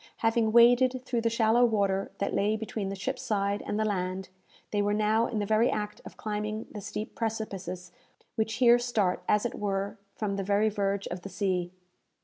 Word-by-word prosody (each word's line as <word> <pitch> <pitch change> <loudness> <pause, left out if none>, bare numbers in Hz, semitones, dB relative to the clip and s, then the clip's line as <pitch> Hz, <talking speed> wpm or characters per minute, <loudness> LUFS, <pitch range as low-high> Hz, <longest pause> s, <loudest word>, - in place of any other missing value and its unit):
Having 225 -1 +2
waded 245 +2 +6
through 240 -3 -1
the 230 - +2
shallow 230 +1 +3
water 200 -4 +1
that 200 - -2
lay 210 +2 +2
between 215 -2 -4
the 195 - -4
ship's 255 +7 -3
side 200 -1 0
and 210 - -1
the 215 - +1
land, 185 -2 -2 0.4
they 205 - +1
were 205 0 +1
now 215 +2 +2
in 225 - -3
the 205 - 0
very 220 +3 +3
act 210 0 -3
of - - -11
climbing 215 +1 -3
the 210 - -7
steep 205 +2 -5
precipices 195 -5 -4 0.4
which 220 -1 -1
here 240 +1 +6
start, 220 -7 0
as 210 +2 +3
it 240 - -2
were, 200 -1 -2 0.2
from 200 -2 -2
the 195 - -1
very 205 +2 +2
verge 200 -1 -1
of 180 0 -5
the 195 - -8
sea. 185 -3 -1
210 Hz, 195 wpm, -29 LUFS, 200-225 Hz, 0.4 s, waded